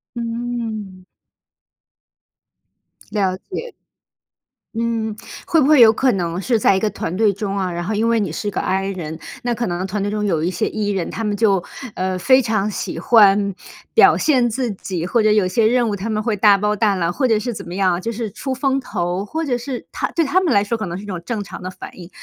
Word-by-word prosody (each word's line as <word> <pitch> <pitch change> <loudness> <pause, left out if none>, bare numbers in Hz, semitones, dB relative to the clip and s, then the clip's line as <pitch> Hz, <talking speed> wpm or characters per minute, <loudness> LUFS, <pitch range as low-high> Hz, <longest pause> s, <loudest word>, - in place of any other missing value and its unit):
嗯。 230 -5 -4 2.1
了 195 -3 0 0.2
解。 475 +5 -5 1.0
嗯， 225 -2 -1 0.3
会 325 -2 +3
不 275 - +3
会 300 -3 +6
有 225 -1 +8
可 260 +2 +2
能 175 -1 -2
是 235 +2 +1
在 195 - +4
一 - - +1
个 215 - 0
团 180 -3 -4
队 215 0 +3
中 195 0 -4
啊， 185 -2 -1
然 175 0 -4
后 215 +5 -2
因 220 +2 +1
为 230 -1 +3
你 195 -7 -1
是 205 +5 -3
个 - - -3
I 195 +1 -1
人， 165 -4 -5 0.2
那 240 -1 0
可 235 0 -2
能 175 +1 -2
团 200 +1 -3
队 205 - -1
中 210 0 -2
有 165 -5 0
一 175 - +1
些 180 - -1
E 210 -1 -2
人， 190 -4 -2
他 225 - -4
们 205 -1 -1
就， 195 -5 +2 0.3
呃， 185 0 -2
非 260 +8 +4
常 215 -3 0
喜 - - -4
欢 200 -3 +4 0.4
表 - - +6
现 255 -6 +2
自 240 0 -2
己， 185 -3 -4
或 230 +4 +2
者 215 0 +3
有 210 -3 +3
些 215 +4 +2
任 240 0 +2
务 205 - -1
他 205 +4 -5
们 215 0 -1
会 225 -3 0
大 205 0 +5
包 210 +1 0
大 205 -1 +2
揽， 175 -1 -1
或 260 +3 +1
者 220 -2 +3
是 235 +3 -3
怎 - - -7
么 175 - -6
样 190 -2 +2
啊， 175 - -2
就 230 +5 -3
是 220 -2 -4
出 265 +4 -5
风 270 0 0
头， 180 -5 -2
或 320 +10 -3
者 250 -3 0
是 250 0 -6
他 - - -2
对 330 -2 +2
他 370 +7 +2
们 340 -7 +1
来 200 -2 +4
说 230 +3 -2
可 215 -4 -4
能 175 +1 -4
是 200 - -8
一 - - -9
种 180 -4 -5
正 215 -1 -3
常 - - -9
的 185 - -5
反 185 - -10
应。 175 0 -10
210 Hz, 255 characters per minute, -20 LUFS, 190-235 Hz, 2.1 s, 有